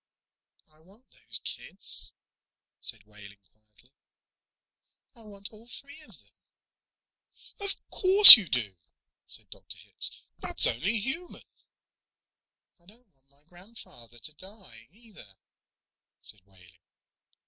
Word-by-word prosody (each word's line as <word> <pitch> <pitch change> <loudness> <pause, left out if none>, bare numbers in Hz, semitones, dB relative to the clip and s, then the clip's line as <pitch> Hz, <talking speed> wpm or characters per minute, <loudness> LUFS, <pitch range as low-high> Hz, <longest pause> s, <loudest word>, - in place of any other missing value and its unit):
"I 155 - -24
want 195 +10 -25
those - - -2
kids," - - -7 0.7
said 110 -4 -7
Wehling 105 -1 -19
quietly. 110 +3 -28 1.2
"I - - -22
want 200 0 -10
all 220 +2 -18
three 280 +5 -15
of 305 - -20
them." - - -24 1.3
"Of 400 -1 -8 0.2
course 390 +2 +10
you 205 -7 -6
do," 105 -7 -6 0.5
said - - -6
Dr. - - -11
Hitz. - - -5 0.3
"That's - - -2
only 185 - -4
human." 310 - -10 1.4
"I 170 - -30
don't 225 +3 -24
want 135 0 -33
my 140 +1 -27
grandfather 175 - -17
to 155 +6 -8
die, 180 - -17
either," 205 - -21 0.9
said 105 - -9
Wehling. 90 -3 -22
175 Hz, 115 wpm, -23 LUFS, -, 1.4 s, course